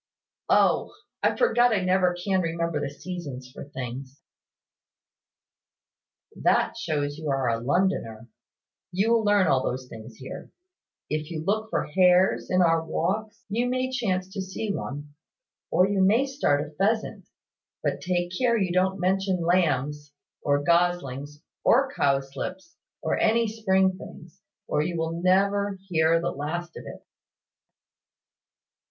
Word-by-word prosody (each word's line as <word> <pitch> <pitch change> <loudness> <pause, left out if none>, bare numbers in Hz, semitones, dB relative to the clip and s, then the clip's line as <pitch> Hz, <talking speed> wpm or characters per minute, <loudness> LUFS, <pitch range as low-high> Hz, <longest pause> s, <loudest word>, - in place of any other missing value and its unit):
"O, - - +3 0.3
I - - +2
forgot 245 - +3
I 210 -3 +2
never 185 -1 +2
can 185 +1 0
remember 170 -2 -1
the 145 -1 -2
seasons 145 -5 -7
for - - -9
things." 130 0 -7 2.2
"That - - +2
shows 145 -2 -2
you 155 -2 -4
are 135 -2 0
a 115 0 0
Londoner. 125 - 0 0.6
You 195 +5 +1
will 230 -1 +3
learn 205 -2 +4
all 130 -5 +2
those 130 0 -3
things 110 0 -10
here. 130 +3 -9 0.6
If 155 0 -2
you 160 -2 -4
look 215 +3 0
for - - 0
hares 180 +2 +3
in 185 0 +3
our 165 -1 +3
walks, 200 +7 -3
you 235 +4 0
may 255 +1 -1
chance 190 -8 -1
to 200 - -3
see 195 +2 -3
one; 145 -3 -6 0.6
or 185 - +4
you 200 -1 +1
may 220 +8 +4
start 150 - 0
a - - -13
pheasant; 210 +7 -1 0.6
but - - -1
take 175 -1 -1
care 240 -2 +2
you 190 -4 0
don't 190 +1 +1
mention 185 -1 0
lambs, 150 -4 0 0.3
or 145 0 +1
goslings, 150 -4 0 0.2
or 270 +3 +4
cowslips, 140 - -2 0.3
or - - 0
any 230 +1 +3
spring 190 -3 +1
things; 175 +3 -12 0.3
or - - +1
you 170 +2 -2
will 165 +1 -2
never 200 +2 +2
hear 165 -1 +3
the 170 - -2
last 170 +4 -4
of - - -9
it." - - -10
175 Hz, 140 wpm, -26 LUFS, 145-195 Hz, 2.2 s, learn